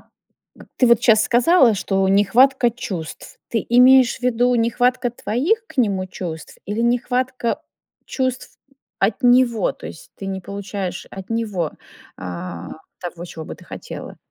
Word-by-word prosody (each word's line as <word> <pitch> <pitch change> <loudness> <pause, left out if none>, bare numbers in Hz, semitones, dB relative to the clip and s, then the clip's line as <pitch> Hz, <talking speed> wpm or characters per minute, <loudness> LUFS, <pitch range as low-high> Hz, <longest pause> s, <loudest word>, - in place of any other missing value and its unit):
к - - -28 0.7
ты 250 - +4
вот 235 -1 +4
щас 220 -3 +5
сказала, 250 +1 +4
что 195 0 0
нехватка 240 +6 +4
чувств. 185 -9 -7
Ты 225 - -1
имеешь 250 0 +6
в - - -25
виду 245 0 +2
нехватка 245 +2 +1
твоих 320 - -1
к 280 - -16
нему 195 -6 +1
чувств 165 -3 -7
или 210 +3 -2
нехватка 245 +1 0 0.4
чувств 260 -1 -3 0.4
от 210 +7 0
него? 245 -4 +3
То - - -11
есть - - -11
ты 195 - -7
не 190 0 -4
получаешь 200 -1 -5
от 195 +2 -10
него, 210 -8 -2 0.5
а, 90 -1 -6 0.3
того, 175 -1 -6
чего 160 -2 -8
бы - - -7
ты - - -17
хотела? - - -9
230 Hz, 145 wpm, -21 LUFS, 195-250 Hz, 0.7 s, имеешь